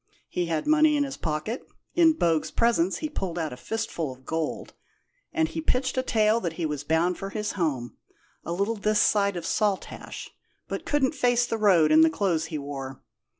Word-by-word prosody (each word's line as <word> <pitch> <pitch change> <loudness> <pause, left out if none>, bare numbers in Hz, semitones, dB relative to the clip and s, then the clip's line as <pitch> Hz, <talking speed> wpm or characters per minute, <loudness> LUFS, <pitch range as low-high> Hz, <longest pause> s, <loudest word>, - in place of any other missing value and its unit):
He 175 -1 -1
had 160 -2 -1
money 305 -1 +4
in 290 - +2
his 275 -1 -4
pocket 160 - -3 0.3
in 330 -2 +5
Bogue's 165 - +1
presence 225 -6 +2
he - - +1
pulled 190 - -4
out 160 -5 -2
a - - -6
fistful 170 - -3
of 130 0 -14
gold 160 -1 -3 0.6
and 325 -1 +1
he 320 - -4
pitched 260 -4 0
a 255 - +2
tale 220 -3 +2
that 170 -6 -3
he 165 0 -3
was 150 -2 -3
bound 165 +4 +1
for 195 - -4
his 210 +1 -3
home, 140 -10 -2 0.5
a - - -5
little 200 +6 0
this 210 0 +1
side 200 -2 +3
of 170 - -5
Saltash, 205 -1 -2 0.4
but - - -5
couldn't 290 -1 +2
face 245 -3 +2
the 225 -2 -3
road 175 -7 +5
in 155 +1 +7
the 160 - +6
clothes 165 -1 0
he 165 -2 -4
wore. 135 -2 -6
190 Hz, 195 wpm, -26 LUFS, 160-235 Hz, 0.6 s, in